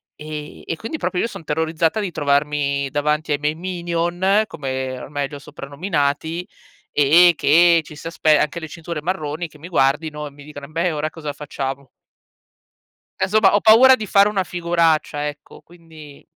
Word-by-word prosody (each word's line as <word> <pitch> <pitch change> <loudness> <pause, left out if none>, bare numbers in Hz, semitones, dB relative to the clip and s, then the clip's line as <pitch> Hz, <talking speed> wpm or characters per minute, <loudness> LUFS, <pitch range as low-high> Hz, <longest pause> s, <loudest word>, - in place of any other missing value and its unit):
E 150 -1 -8
e - - -3
quindi 225 - -5
proprio 180 -10 -2
io - - 0
son 170 - -10
terrorizzata 160 +5 0
di 195 -4 -3
trovarmi 140 -1 0
davanti 150 +1 -1
ai 145 - -1
miei 150 +1 -1
Minion, 175 +3 0
come 130 -5 -4
ormai 145 0 -4
li - - -15
ho - - -8
soprannominati 145 +3 -3 0.4
e 170 +5 +6
che 170 +3 +5
ci 150 +1 -12
si 155 - -12
aspe 155 -2 +3
anche 150 +3 -1
le 160 - -7
cinture 165 0 -6
marroni, 165 -1 -3
che 155 - -18
mi 165 - -9
guardino 150 0 0
e - - -11
mi 145 0 -15
dicano: 145 -1 -10
"Embè 165 +2 -1
ora 155 +1 -2
cosa 150 -3 -6
facciamo?". 135 -2 -5 1.3
E 190 - +1
somma, 210 -1 +4
ho - - +4
paura 250 +4 +7
di 215 - -6
fare 200 +2 +5
una 195 -3 0
figuraccia, 165 -4 0
ecco, 145 0 -10
quindi 160 -4 -15
155 Hz, 170 wpm, -20 LUFS, 145-175 Hz, 1.3 s, paura